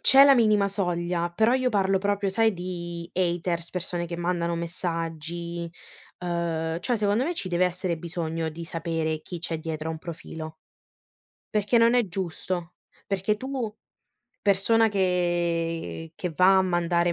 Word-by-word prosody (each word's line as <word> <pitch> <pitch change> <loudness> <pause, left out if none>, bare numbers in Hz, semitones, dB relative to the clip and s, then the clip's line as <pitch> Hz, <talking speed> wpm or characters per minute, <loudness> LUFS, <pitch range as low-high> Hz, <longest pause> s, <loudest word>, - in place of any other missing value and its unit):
C'è 270 +1 +9
la 280 -1 +8
minima 215 -4 +4
soglia, 175 -3 -1
però 220 +7 +3
io 255 -1 +2
parlo 195 -3 +2
proprio, 200 0 0
sai, 225 +1 +3
di 175 -1 -5
haters, 175 -1 0
persone 175 -1 -2
che 170 - -5
mandano 170 -1 0
messaggi, 170 0 -3 0.5
uhm, 170 -2 -1
cioè 240 +5 +1
secondo 210 +4 +2
me 345 +2 -1
ci 195 - -3
deve 175 +1 +3
essere 180 -1 -2
bisogno 165 -1 -3
di 165 +2 -7
sapere 165 -2 -2
chi 175 +2 -7
c'è 165 -2 -2
dietro 160 0 -4
a - - -1
un 160 - -6
profilo 160 -1 -7 1.0
perché 210 +3 +3
non 230 +1 +5
è 245 -4 +3
giusto, 175 -1 -3 0.3
perché 195 +2 0
tu 255 -3 -4 0.7
persona 220 +3 +4
che 175 -4 0
che 180 0 -3
va 185 +4 +5
a - - +4
mandare 175 -1 +1
175 Hz, 150 wpm, -26 LUFS, 170-200 Hz, 1.0 s, C'è